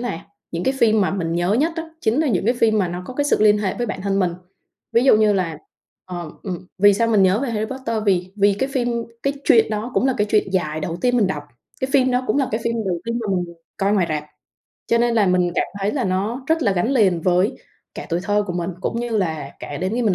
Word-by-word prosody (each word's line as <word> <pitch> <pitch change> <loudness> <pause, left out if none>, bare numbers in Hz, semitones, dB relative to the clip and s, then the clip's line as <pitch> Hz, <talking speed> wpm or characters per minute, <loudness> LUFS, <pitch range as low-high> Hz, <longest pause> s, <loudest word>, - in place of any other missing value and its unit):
là 240 -9 -3 0.3
những 170 +1 -3
cái 265 - +1
phim 220 -3 +4
mà 190 - +2
mình 170 -4 -2
nhớ 175 +3 +1
nhất 315 +7 +1
á 330 - -3 0.2
chính 235 +7 +1
là 310 - +1
những 195 -4 0
cái 240 +3 +2
phim 220 -2 +2
mà 185 - +1
nó 175 +1 -5
có 255 - -8
cái 290 - 0
sự 290 - +3
liên 210 -1 +5
hệ 195 -3 -1
với 240 -1 -2
bản 190 - -5
thân 195 0 0
mình. 180 -3 +1 0.6
Ví 235 +3 +3
dụ 240 - +6
như 215 -1 +4
là, 170 -5 -1 0.5
ờ, 175 -4 -6
ừm, 180 -2 -6
vì 205 0 +6
sao 230 +3 +1
mình 210 -4 +4
nhớ 190 +2 +4
về 275 - -2
Harry 215 -1 -1
Potter, 230 -4 -3
vì 185 -1 +1
vì 200 0 +4
cái 265 +7 -1
phim 245 -2 0 0.3
cái 275 - +1
chuyện 225 -1 +5
đó 215 +3 -3
cũng 265 - +2
là 260 - +1
cái 210 - +2
chuyện 210 -2 +2
dài 155 -4 -1
đầu 165 +2 -3
tiên 245 0 +3
mình 210 -5 +3
đọc, 150 -6 -3 0.4
cái 260 - -1
phim 260 -2 +4
đó 250 +1 0
cũng 215 - +1
là 270 -3 +1
cái 220 - 0
phim 230 0 0
đầu 175 -2 -1
tiên 230 +1 -2
mà 220 - -4
mình 175 -1 -4 0.2
coi 195 +1 +1
ngoài 185 -4 +2
rạp, 150 -1 -2 0.6
cho 235 - +3
nên 235 0 +2
là 210 -3 +3
mình 180 -1 +2
cảm - - +2 0.2
thấy 200 +2 0
là 265 -6 -1
nó 205 +8 -2
rất 320 0 +1
là 200 -4 +2
gắn 190 +8 0
liền 195 -10 +3
với 185 +6 +2 0.4
cả - - -7
tuổi 170 +1 0
thơ 205 +1 +1
của 180 - -3
mình, 175 +1 -2
cũng 230 - -2
như 240 - -3
là 160 -6 -2
kể 145 - -6
đến 185 +3 -2
khi 245 - 0
mình 205 -5 +2
205 Hz, 275 wpm, -21 LUFS, 180-240 Hz, 0.6 s, dụ